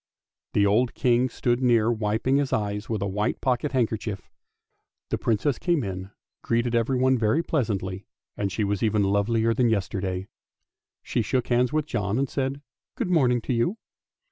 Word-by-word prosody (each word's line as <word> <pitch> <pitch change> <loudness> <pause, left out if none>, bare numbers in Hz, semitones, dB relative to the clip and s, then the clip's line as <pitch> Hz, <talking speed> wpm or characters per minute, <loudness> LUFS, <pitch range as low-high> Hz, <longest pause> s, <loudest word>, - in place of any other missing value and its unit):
The 100 - +3
old 115 +5 +2
King 125 0 +2
stood 120 0 0
near 120 -2 +3
wiping 110 +4 +1
his 140 -1 0
eyes 105 0 -2
with 110 -3 -1
a - - -1
white 105 +4 -1
pocket 130 +2 0
handkerchief. 110 -6 -1
Then - - -34 0.8
the - - +1
Princess 115 +4 0
came 170 -6 +1
in, 95 -1 -5 0.3
greeting 120 +1 0
everyone 130 +2 +2
very 115 +9 +2
pleasantly, 100 - -2 0.3
and 100 -1 -2
she 105 +4 -1
was 100 -1 -1
even 105 -2 +2
lovelier 110 +3 +2
than 120 0 +2
yesterday. 95 -3 -2 0.8
She - - -1
shook 125 +2 -1
hands 125 0 +2
with 155 -1 0
John 105 -6 -1
and 135 +1 +1
said, 135 +2 -3 0.2
" - - -68
Good 180 - -1
morning 125 -8 +3
to 125 - -2
you." 125 - 0
115 Hz, 170 wpm, -25 LUFS, 105-130 Hz, 0.8 s, The